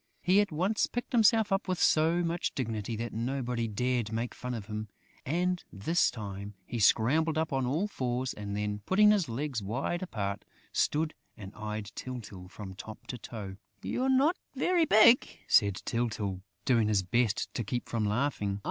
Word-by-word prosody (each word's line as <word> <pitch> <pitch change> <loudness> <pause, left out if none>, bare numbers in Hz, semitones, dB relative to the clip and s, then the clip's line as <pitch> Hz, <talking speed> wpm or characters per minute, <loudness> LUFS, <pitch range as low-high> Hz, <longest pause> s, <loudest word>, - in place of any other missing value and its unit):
He 190 +3 +5
at 205 - -2
once 185 +8 +1
picked 245 - -4
himself 225 -2 +4
up 195 +1 +1
with 185 -2 -1
so 165 +3 +3
much 170 0 -1
dignity 115 -3 -2
that 115 0 -4
nobody 120 0 -2
dared 120 +1 -1
make 115 +2 -2
fun 125 -1 -5
of 110 -4 -6
him; 105 0 -5 0.4
and, 180 +4 0
this 135 - +2
time, 100 -3 -7
he 120 - -4
scrambled 145 +10 +3
up 160 -2 0
on 135 -2 0
all 160 +11 0
fours 125 -7 -2
and 100 -1 -5
then, 105 0 -2
putting 210 +2 +6
his 195 - +2
legs 130 0 -2
wide 135 - -2
apart, 100 - -3 0.3
stood 155 +1 +1 0.2
and 100 -2 -9
eyed 105 -1 -5
Tyltyl 105 -8 -7
from 95 -1 -8
top 105 +3 -10
to 125 - -6
toe. 100 -5 -7 0.3
"You're 260 +2 0
not 275 +7 +4 0.2
very 355 -2 +3
big!" 230 0 +6
said 100 -2 +4
Tyltyl, 105 -5 -2 0.2
doing 115 -5 +3
his 105 -3 +2
best 110 +2 0
to 120 - -2
keep 120 +4 -3
from 115 -2 -1
laughing. 105 -3 0
120 Hz, 175 wpm, -30 LUFS, 105-165 Hz, 0.4 s, putting